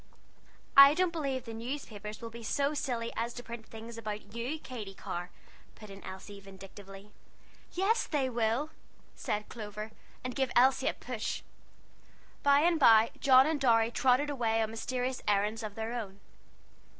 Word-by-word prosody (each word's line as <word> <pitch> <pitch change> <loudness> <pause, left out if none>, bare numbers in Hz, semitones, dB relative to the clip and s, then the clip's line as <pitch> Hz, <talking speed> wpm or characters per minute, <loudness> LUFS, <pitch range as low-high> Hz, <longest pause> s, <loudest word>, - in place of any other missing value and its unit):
"I 275 +1 +10
don't 365 0 +2
believe 275 -6 -3
the 230 - -7
newspapers 225 -3 -6
would 230 - -6
be 235 +1 -9
so 280 +6 0
silly 240 -5 -2
as 235 +1 -2
to 245 - -7
print 235 -2 -8
things 230 +1 -9
about 210 -1 -6
you, 240 +7 -3
Katy 220 -10 -8
Carr," 175 -1 -5 0.5
put 215 -2 -12
in 195 0 -11
Elsie, 190 +2 -9
vindictively. 195 +1 -12 0.6
"Yes 395 +6 +1
they 285 -4 0
will!" 240 +5 0 0.4
said 210 0 -3
Clover; 215 -1 -7 0.3
and 255 0 -3
gave 265 -2 0
Elsie 260 +1 +4
a - - 0
push. 240 -3 -4 1.0
By 285 0 +5
and 335 0 +3
by 225 -4 +7
John 260 -1 +7
and 310 -1 -1
Dorry 230 -3 +4
trotted 260 +4 +2
away 225 -4 +1
on 220 - -3
mysterious 250 +3 -3
errands 210 +2 +1
of 210 -2 -6
their 225 +1 -4
own. 200 -5 -5
230 Hz, 160 wpm, -31 LUFS, 215-265 Hz, 1.0 s, I